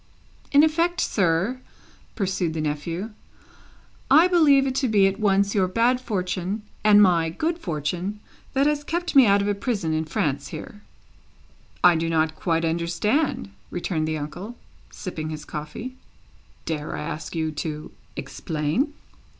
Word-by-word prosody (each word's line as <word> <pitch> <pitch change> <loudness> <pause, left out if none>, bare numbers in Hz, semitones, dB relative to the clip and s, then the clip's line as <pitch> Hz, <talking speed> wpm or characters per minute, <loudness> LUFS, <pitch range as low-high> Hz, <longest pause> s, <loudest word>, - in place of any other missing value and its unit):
"In 285 +1 +6
effect, 335 +2 +2
sir," 195 - +1 0.5
pursued 185 -5 -1
the - - -2
nephew, 165 +7 -3 1.0
"I 315 +6 +7
believe 300 -7 +5
it 265 - -1
to 265 - +1
be 205 -4 +4
at 195 0 0
once 200 -1 +2
your 195 -4 +2
bad 235 +6 +2
fortune, 195 -2 -2 0.2
and 210 -1 +7
my 170 -4 +3
good 325 - -2
fortune, 175 - -3 0.3
that 270 +1 +3
has 295 0 +1
kept 345 +2 -3
me 265 -4 +8
out 200 0 +4
of - - -1
a 205 - +2
prison 200 -6 -2
in 160 0 0
France 145 -2 -1
here." 205 - -9 1.0
"I 180 -1 +7
do 165 +1 -1
not 160 -1 +1
quite 165 0 0
understand," 170 - 0 0.2
returned 165 -3 -2
the 155 0 -1
uncle, 175 +10 -6 0.3
sipping 155 -4 -6
his 155 -1 -6
coffee. 185 +13 -7 0.7
"Dare 150 -2 -3
I - - -4
ask 155 +2 -5
you 160 -1 -1
to 150 0 -5 0.2
explain?" 160 - -2
185 Hz, 150 wpm, -24 LUFS, 160-250 Hz, 1.0 s, me